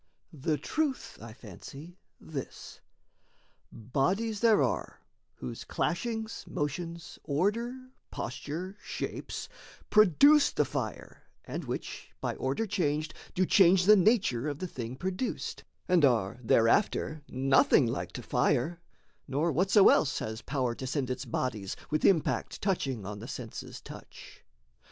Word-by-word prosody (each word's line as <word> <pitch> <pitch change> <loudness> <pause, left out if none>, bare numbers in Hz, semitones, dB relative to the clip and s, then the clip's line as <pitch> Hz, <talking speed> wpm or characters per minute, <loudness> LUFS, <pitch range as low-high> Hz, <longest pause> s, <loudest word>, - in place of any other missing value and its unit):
The 150 +1 -1
truth, 305 - -2
I 115 0 -9
fancy, 135 - -11 0.2
this: 145 -5 -8 0.9
bodies 185 - -1
there 225 -2 +5
are - - -2 0.4
Whose - - -7
clashings, 225 -2 -2
motions, 170 +3 -4
order, 210 - 0 0.3
posture, 155 +10 -5
shapes - - -5 0.4
Produce 280 - +6
the - - +2
fire - - -5 0.2
and - - -5
which, - - -5
by - - -2
order 135 +12 -1
changed, 155 -6 -1 0.2
Do 185 - +3
change 180 -1 +5
the 210 +2 +8
nature 185 - +3
of 145 - -4
the 185 - -4
thing 125 -7 -6
produced, 190 - -3 0.2
And 180 -3 +4
are 115 -4 +2
thereafter 145 - +2
nothing 135 +1 +4
like 115 +3 -3
to 125 - -6
fire 140 +8 +1 0.5
Nor 150 +5 0
whatso 190 +6 +5
else 140 -2 +3
has 110 +1 -4
power 130 -3 -1
to 130 +2 -6
send 130 -1 -1
its 125 +2 -4
bodies 110 -5 -3 0.2
With 155 - +1
impact 170 -6 +2
touching 135 - -1
on 105 +1 -6
the 115 - -8
senses' 125 -4 -7
touch. - - -12
150 Hz, 130 wpm, -30 LUFS, 130-190 Hz, 0.9 s, the